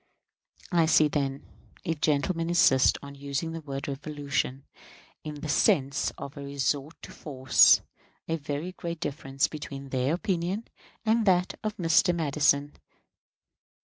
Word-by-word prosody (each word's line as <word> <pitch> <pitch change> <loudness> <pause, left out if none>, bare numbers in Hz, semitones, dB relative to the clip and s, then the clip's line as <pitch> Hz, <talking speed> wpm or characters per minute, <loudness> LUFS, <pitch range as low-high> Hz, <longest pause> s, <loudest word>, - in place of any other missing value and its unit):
I 170 -2 +3
see, 155 -1 +5
then 140 -2 -2 0.4
if 160 -2 -3
gentlemen 165 +3 +1
insist 135 -6 +4
on 140 0 -9
using 140 +3 -4
the 165 0 -6
word 140 -2 -5
"revolution" 140 -1 -3 0.6
in 150 -1 -6
the 155 - -4
sense 145 -4 +2
of 140 - -8
a 140 - -8
resort 140 +2 -2
to - - -9
force 130 -4 +4 0.5
a 165 - -1
very 150 +3 -4
great 170 -2 -6
difference 135 -3 -1
between 140 -2 -8
their 130 +4 0
opinion 185 +4 -2 0.4
and 220 0 +2
that 180 -1 +3
of 215 -1 -3
Mr. 170 +1 +3
Madison. 145 -2 +1
150 Hz, 135 wpm, -27 LUFS, 140-170 Hz, 0.6 s, see